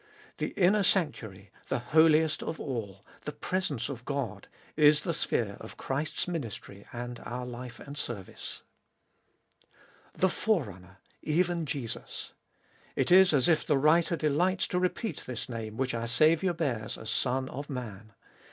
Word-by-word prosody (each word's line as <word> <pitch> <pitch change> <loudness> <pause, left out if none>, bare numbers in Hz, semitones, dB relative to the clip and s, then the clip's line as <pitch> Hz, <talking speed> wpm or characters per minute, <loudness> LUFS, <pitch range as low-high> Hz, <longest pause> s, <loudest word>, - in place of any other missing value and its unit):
The - - 0
inner 200 +3 +5
sanctuary, 110 - 0 0.2
the - - +1
Holiest 155 +4 +4
of 160 - -4
All, 100 -7 -5 0.2
the 150 - -2
presence 150 -6 -2
of 130 -4 -6
God, 140 -5 -3 0.3
is 150 0 +6
the - - 0
sphere - - -1
of - - -10
Christ's 145 +6 -2
ministry 115 - -5
and 120 0 -5
our 125 +1 -5
life 125 -1 -7
and 140 0 -9
service. 110 -9 -5 1.5
The 190 - +3
Forerunner, 100 - -1 0.2
even 170 0 +1
Jesus! 135 -5 -4 0.6
It - - +1
is 190 +1 +8
as 140 -5 +4
if 165 -3 +4
the 150 - +2
writer 160 +4 +4
delights 165 +5 +2
to 180 - +1
repeat 185 +5 -2
this 125 -3 -4
name 110 -2 -5
which 130 -1 0
our 115 0 -2
Saviour 155 +8 +3
bears 115 -8 -2
as 110 - -5
Son 130 +2 +1
of 140 +2 -6
Man. 110 -5 -6
140 Hz, 145 wpm, -30 LUFS, 120-165 Hz, 1.5 s, is